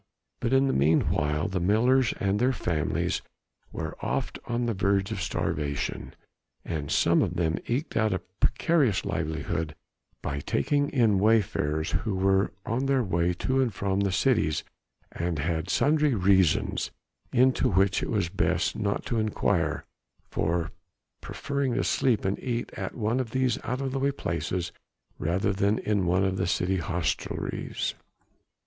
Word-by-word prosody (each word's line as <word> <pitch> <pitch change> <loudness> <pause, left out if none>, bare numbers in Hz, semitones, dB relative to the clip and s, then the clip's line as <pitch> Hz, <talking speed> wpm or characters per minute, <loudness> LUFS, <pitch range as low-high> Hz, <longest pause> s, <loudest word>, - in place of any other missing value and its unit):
But 120 - -1
in 135 +1 +4
the 135 - +1
meanwhile 75 +1 +2
the 95 0 -2
millers 115 +7 +3
and 100 +1 +1
their 130 +3 +3
families 80 - -1 0.5
were - - -5
oft - - -2
on 120 0 -1
the 115 - 0
verge 100 +1 +1
of 100 -4 -3
starvation, 70 -5 -2 0.5
and 75 -4 -3
some - - +3
of - - -1
them 80 -1 0
eked 130 +7 -2
out 110 -1 +2
a 95 - +1 0.2
precarious 140 - +2
livelihood 80 0 -2 0.5
by 70 - -2
taking 145 - 0
in 115 -7 +3
wayfarers 90 -8 +1
who 105 -4 -1
were 95 +1 +2
on 125 +4 -1
their 135 -2 +2
way 85 -3 +1
to 130 0 +2
and 120 -7 0
from 95 0 0
the 100 -1 +1
cities 100 - +2 0.5
and 85 -1 -2
had 80 +2 -2
sundry 150 -2 +3
reasons 95 -4 +2 0.4
into 130 +1 +3
which 95 0 +2
it - - -3
was 105 -6 +1
best 95 +4 0
not 100 -1 -1
to 115 - 0
inquire 110 -1 0 0.5
for 80 0 0 0.5
preferring 140 -3 -2
to - - +1
sleep 120 -7 +1
and 95 +1 0
eat 120 -2 -3
at - - -5
one 115 +2 0
of 125 -3 -2
these 130 -1 0
out 125 +2 -2
of 135 -1 -2
the 135 - -2
way 140 +1 +2
places 90 -6 -3 0.5
rather 90 +6 0
than 100 +2 +1
in 100 -4 0
one 90 +2 +3
of 95 -1 0
the 95 - 0
city 90 +2 +1
hostelries. 85 -2 -2
100 Hz, 155 wpm, -27 LUFS, 85-120 Hz, 0.5 s, in